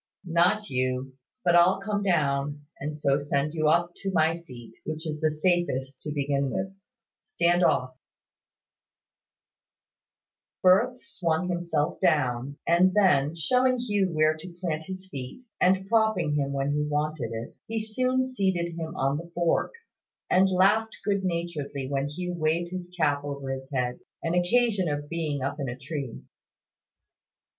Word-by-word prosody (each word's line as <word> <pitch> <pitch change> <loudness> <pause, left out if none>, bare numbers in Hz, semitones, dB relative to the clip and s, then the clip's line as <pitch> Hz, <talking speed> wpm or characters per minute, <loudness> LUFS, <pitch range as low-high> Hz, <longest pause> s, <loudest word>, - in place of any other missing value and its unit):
"Not 180 +5 +2
you: 130 +1 -1 0.3
but 175 -1 +5
I'll 175 +2 +5
come 205 +1 -2
down, 145 -5 0
and 150 +1 -4
so 140 -1 +2
send 145 +1 -1
you 155 -2 +1
up 170 +3 +3
to 195 - -3
my 160 -2 +3
seat, 125 -9 -11
which 155 +1 -5
is 155 -1 -4
the 155 - +3
safest 150 -5 0
to 150 - -5
begin 140 -1 0
with. 190 +5 -3 0.5
Stand 175 - +1
off." 130 -5 +2 2.7
Firth 215 +8 +5
swung 180 -4 -1
himself 170 -4 -1
down, 130 -1 +1
and 180 +3 +4
then, 155 -7 +4
showing 255 - +2
Hugh 205 -6 0
where 155 0 +3
to 170 +2 -10
plant 160 -3 -2
his 190 +1 -7
feet, 135 - -7 0.2
and 190 +1 +3
propping 220 -8 +2
him 140 -2 0
when 140 0 -1
he 150 +1 +1
wanted 150 -3 -1
it, 115 +1 -6
he 225 - -3
soon 255 +4 0
seated 190 -9 -1
him 160 -1 -5
on 135 +2 +1
the 170 +2 -8
fork, 175 - +1 0.6
and 190 +1 +5
laughed 205 +4 +3
good 200 -2 +1
naturedly 170 -6 -3
when 135 0 -1
Hugh 180 +5 -4
waved 170 +1 0
his 180 -1 -5
cap 145 -3 +2
over 140 -2 -4
his 135 0 -6
head, 125 -2 -1 0.3
on 165 - 0
occasion 195 0 +2
of 145 0 -3
being 155 -5 -2
up 140 +3 -3
in 135 -2 -2
a 120 - -5
tree. 135 -2 -6
165 Hz, 150 wpm, -27 LUFS, 145-185 Hz, 2.7 s, but